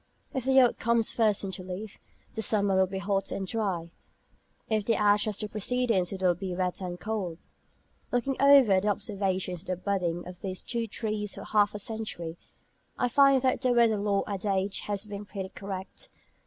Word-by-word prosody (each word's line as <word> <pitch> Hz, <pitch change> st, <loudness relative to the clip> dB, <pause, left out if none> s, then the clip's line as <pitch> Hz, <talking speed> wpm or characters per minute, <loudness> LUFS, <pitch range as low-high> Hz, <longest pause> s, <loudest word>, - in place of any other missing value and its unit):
If 260 Hz, -3 st, -3 dB
the 265 Hz, 0 st, +5 dB
oak 245 Hz, -, +3 dB
comes 235 Hz, -1 st, +2 dB
first 215 Hz, -3 st, +2 dB
into 190 Hz, -1 st, -4 dB
leaf, 185 Hz, +3 st, -7 dB, 0.3 s
the 220 Hz, -, -3 dB
summer 205 Hz, -3 st, +1 dB
will 190 Hz, 0 st, +4 dB
be 190 Hz, +1 st, -5 dB
hot 195 Hz, 0 st, -1 dB
and 195 Hz, -, -3 dB
dry, 185 Hz, -6 st, -2 dB, 0.8 s
if 215 Hz, -2 st, +1 dB
the 225 Hz, +2 st, +1 dB
ash 205 Hz, 0 st, +3 dB
has 210 Hz, -2 st, -2 dB
the 210 Hz, -, -3 dB
precedence 215 Hz, -3 st, 0 dB
it 190 Hz, -1 st, -5 dB
will 180 Hz, -1 st, +5 dB
be 180 Hz, +1 st, -5 dB
wet 180 Hz, +1 st, -2 dB
and 180 Hz, -1 st, -5 dB
cold. 200 Hz, -6 st, -3 dB, 0.7 s
Looking 245 Hz, +2 st, 0 dB
over 270 Hz, -9 st, +7 dB
the 205 Hz, -, -2 dB
observations 195 Hz, -3 st, -1 dB
of 190 Hz, -, -15 dB
the 185 Hz, -, -1 dB
budding 175 Hz, -2 st, -2 dB
of 180 Hz, -1 st, -9 dB
these 185 Hz, -1 st, -4 dB
two 235 Hz, -1 st, -2 dB
trees 210 Hz, -1 st, -3 dB
for -, -, -8 dB
half 210 Hz, -1 st, +2 dB
a -, -, -1 dB
century, 200 Hz, -6 st, -2 dB, 0.6 s
I 250 Hz, -, +1 dB
find 275 Hz, 0 st, +5 dB
that 255 Hz, -2 st, +1 dB
the 255 Hz, -2 st, +2 dB
weather 230 Hz, -3 st, +4 dB
lore 200 Hz, -1 st, +1 dB
adage 195 Hz, -1 st, -1 dB
has 205 Hz, 0 st, 0 dB
been 205 Hz, -1 st, -6 dB
pretty 190 Hz, -1 st, -6 dB
correct. 195 Hz, -1 st, -7 dB
205 Hz, 190 wpm, -28 LUFS, 190-220 Hz, 0.8 s, over